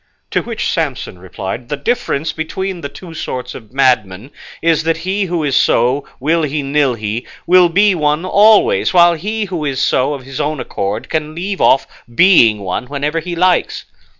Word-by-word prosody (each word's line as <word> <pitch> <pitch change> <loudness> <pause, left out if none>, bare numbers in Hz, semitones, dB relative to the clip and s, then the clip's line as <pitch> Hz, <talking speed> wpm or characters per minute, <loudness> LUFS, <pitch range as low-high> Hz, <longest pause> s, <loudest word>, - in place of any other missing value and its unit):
To - - +1
which - - -4
Samson 90 - -3
replied, 95 +6 -7
"The 145 - -2
difference 160 - -2
between 180 +3 -4
the 140 - -5
two 165 +4 -11
sorts 130 -5 -5
of 110 -3 -12
madmen 125 -4 0 0.3
is, 165 -2 +2
that 165 +1 0
he 195 +3 -2
who 175 -3 -2
is 140 -3 0
so 125 +4 +2
will 160 +5 +1
he 150 -1 -2
nil 140 -2 +1
he, 110 +2 -4 0.2
will 180 0 +5
be 200 +4 +3
one 150 0 0
always, 220 - +4
while 175 -1 +6
he 210 +6 -3
who 175 -5 -4
is 140 -3 -2
so 140 +1 +1
of 135 - -10
his 135 0 -5
own 150 0 -2
accord 100 0 -4
can 155 -1 -3
leave 190 +3 -4
off 135 - +4 0.3
being 120 - +5
one 100 +6 -4
whenever 145 +3 -2
he 175 +1 -5
likes." 180 +1 +1
150 Hz, 180 wpm, -16 LUFS, 130-180 Hz, 0.3 s, while